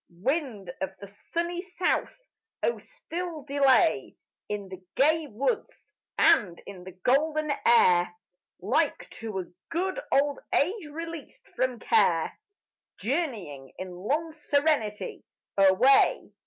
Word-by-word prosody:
Wind 215 - -2
of 190 0 -3
the 200 - -8
sunny 340 - -4
south! 370 +6 -1 0.4
oh 480 - +1
still 350 - -6
delay 270 - +3 0.3
In 205 -1 -3
the 185 -1 -10
gay 310 +3 +3
woods 280 - -3 0.2
and 175 -4 +4
in 190 -3 -10
the 185 - -8
golden 305 +3 +2
air, 180 -7 +5 0.5
Like 275 - 0
to 220 -3 -5
a - - -9 0.2
good 375 +7 -1
old 285 0 +2 0.2
age 365 +3 +1
released 330 0 -8
from 255 0 -1
care, 450 - +2 0.6
Journeying, 210 - -3
in 185 0 -6
long 280 - -2
serenity, 285 -8 0 0.3
away. 195 +8 +4
275 Hz, 115 wpm, -27 LUFS, 200-320 Hz, 0.6 s, air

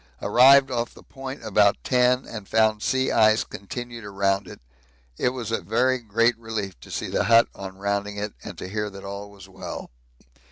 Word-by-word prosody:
Arrived 135 +2 +6
off 120 -1 -2
the - - -15
point 135 -2 -8
about 105 -1 +4
ten 125 0 +2
and 105 -4 -8
found 110 -1 +2
sea 130 +2 +1
ice 110 0 +4
continued 120 +4 -8
around 100 -1 0
it. - - -11 0.6
It - - +2
was 125 -3 -5
a 115 - 0
very 130 +4 +1
great 115 +1 +2
relief 110 - -5
to - - -14
see - - -3
the - - 0
hut 115 +1 +6
on 95 -1 -8
rounding 100 +1 -2
it 105 0 -4
and - - -8
to - - -6
hear 105 +2 -3
that 100 -1 -11
all 100 +1 -6
was 100 -1 -14
well. 95 - -8
110 Hz, 190 wpm, -24 LUFS, 100-120 Hz, 0.6 s, Arrived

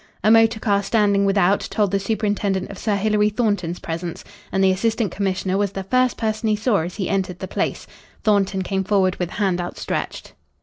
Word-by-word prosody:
A 215 - +5
motor 225 0 +5
car 200 -2 +1
standing 200 -1 +2
without 195 0 +3
told 205 -4 -1
the 200 - +1
superintendent 200 -2 -1
of 200 - -9
Sir 215 -2 0
Hilary 210 +1 +2
Thornton's 205 -6 -1
presence. 170 +1 -5 0.3
And 195 0 +1
the 190 - +5
Assistant 220 +1 0
Commissioner 190 -1 -1
was 200 -1 0
the 195 - -4
first 255 +5 +1
person 220 0 -1
he 215 - +3
saw 215 0 +1
as 175 +1 -3
he 195 -3 -2
entered 190 -3 -1
the 190 - -6
place. - - -2 0.4
Thornton 195 -3 +2
came 190 +1 -1
forward 190 -2 +1
with 180 -2 -2
hand 190 -3 0
outstretched. 175 - -4
200 Hz, 190 wpm, -21 LUFS, 190-215 Hz, 0.4 s, A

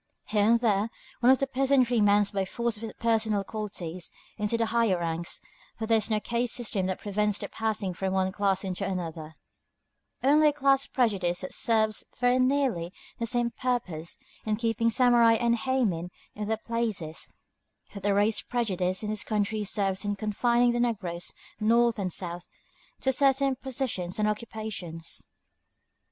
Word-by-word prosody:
Here 210 -1 +2
and 235 0 +5
there 215 -2 +1 0.3
one 245 +1 +6
from - - +9
the 275 - -1
peasantry 260 -3 +2
mounts 205 0 +4
by 195 -2 0
force 235 +4 -2
of 210 - -11
his 225 -1 -6
personal 220 -3 +1
qualities 185 -5 -5 0.3
into 210 +2 0
the 230 - +1
higher 225 -4 +2
ranks, 170 0 -2 0.4
for 225 - -3
there 225 0 +4
is 215 - -1
no 215 -1 +2
caste 235 +2 0
system 210 -6 0
that 185 - -2
prevents 210 0 0
the - - -5
passing 215 -4 -2
from 190 +2 -2
one 190 0 +1
class 195 -1 0
into 190 0 -3
another, 165 -4 -4 0.9
only 300 +3 +5
a 295 - +3
class 275 -1 +2
prejudice 195 -8 0
that 185 - -6
serves 220 -2 +2 0.2
very 245 +1 +3
nearly 255 -10 +1 0.3
the 230 - -1
same 240 0 0
purpose, 195 -12 -3 0.3
in 215 -1 0
keeping 230 +1 +1
samurai 240 -1 +5
and 235 +1 +2
héimin 220 -10 0 0.2
in 210 0 -5
their 220 0 0
places, 220 -9 -3 0.6
that 200 - -7
the 200 0 +1
race 210 +1 +2
prejudice 190 -6 -1
in 210 - -2
this 215 - 0
country 215 0 -1
serves 195 -2 0
in 205 0 -1
confining 235 +4 +2
the 240 - -1
negroes, 195 -8 -1 0.3
North 230 +1 +3
and 185 -2 -1
South, 175 0 -4 0.5
to 265 - +2
certain 270 0 +3
positions 250 -9 -2
and 215 0 +2
occupations. 210 -7 -4
215 Hz, 165 wpm, -28 LUFS, 190-235 Hz, 0.9 s, from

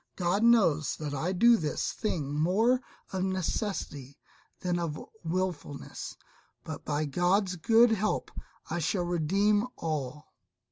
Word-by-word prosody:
God 180 +3 +1
knows 190 - +4
that 150 -2 -5
I 160 +6 -1
do 235 +6 +5
this 155 -6 -2
thing 155 -10 -2
more 205 - +2 0.3
of 185 -1 -1
necessity 185 - -3 0.4
than 175 -1 0
of 160 -3 -3 0.2
wilfulness; 165 -4 -4 0.5
but 155 -2 -7
by 150 +1 -1
God's 180 +6 +1
good 225 +7 +5
help 215 -1 0 0.4
I 175 - -2
shall 175 +3 0
redeem 195 +6 +2
all." 150 -3 -3
175 Hz, 125 wpm, -29 LUFS, 150-205 Hz, 0.5 s, do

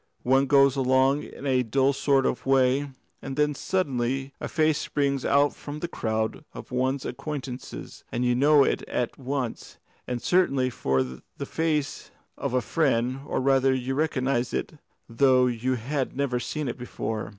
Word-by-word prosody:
"One 135 +2 +3
goes 140 -1 +5
along 130 +2 +3
in - - -10
a 130 -2 +3
dull 135 +4 +2
sort 135 -1 +2
of 125 - -2
way, 135 +1 +3 0.3
and 135 0 -5
then 150 0 +2
suddenly 135 -5 -1
a - - -3
face 155 -1 +2
springs 140 -3 -1
out 140 +1 +3
from 145 +1 -8
the 175 - -3
crowd 110 -3 -2
of - - -9
one's 130 +2 0
acquaintances, 135 -4 -6
and 125 +1 -1
you 125 - +3
know 145 +3 +5
it - - 0
at 120 +2 -2
once 130 -2 -4 0.3
and 125 -1 -2
certainly 135 -6 +2
for 65 - +1
the 65 0 -9
face 155 -3 -2 0.3
of 125 - -3
a 125 - +3
friend, 130 -1 +1
or - - -1
rather 135 0 +3
you 130 +1 -2
recognise 135 -4 0
it, 155 - -4 0.3
though 130 +2 +4
you 125 +1 0
have 130 +3 -3
never 130 -3 0
seen 150 +3 -3
it 120 - -4
before. 110 -3 -4
135 Hz, 165 wpm, -26 LUFS, 125-140 Hz, 0.3 s, goes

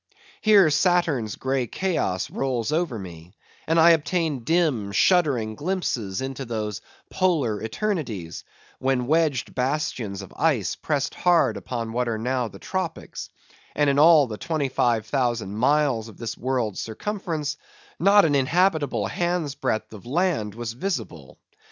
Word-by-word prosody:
Here 200 -7 +6
Saturn's 150 - +1
grey 130 -2 -1
chaos 160 - -1
rolls 130 -2 -1
over 160 -6 0
me, 90 -1 -10 0.3
and 165 +1 +3
I 170 +1 +8
obtain 160 -4 0
dim, 150 - +1
shuddering 135 - +3
glimpses 130 - -2
into 135 0 -4
those 110 -4 -4 0.3
Polar 150 - +1
eternities; 115 - -3 0.4
when 130 -2 0
wedged 155 -3 +1
bastions 125 -7 -2
of 95 - -13
ice 125 - +1
pressed 145 -1 -2
hard 175 -2 +3
upon 115 -2 -5
what 125 +1 0
are 110 - -1
now 125 +2 -1
the 110 - -11
Tropics; - - -5 0.5
and 145 -1 +3
in 140 - +1
all 155 -1 +7
the 110 -4 -7
25,000 120 - 0
miles 130 -1 +2
of 110 - -13
this 115 -1 -5
world's 125 -5 -2
circumference, 155 - -3 0.4
not 200 0 +6
an 150 - +2
inhabitable 160 +2 +2
hand's 175 -4 -1
breadth 125 -7 -2
of 105 +2 -11
land 145 - 0
was 115 -1 -5
visible. 115 - -5
135 Hz, 135 wpm, -24 LUFS, 115-165 Hz, 0.5 s, I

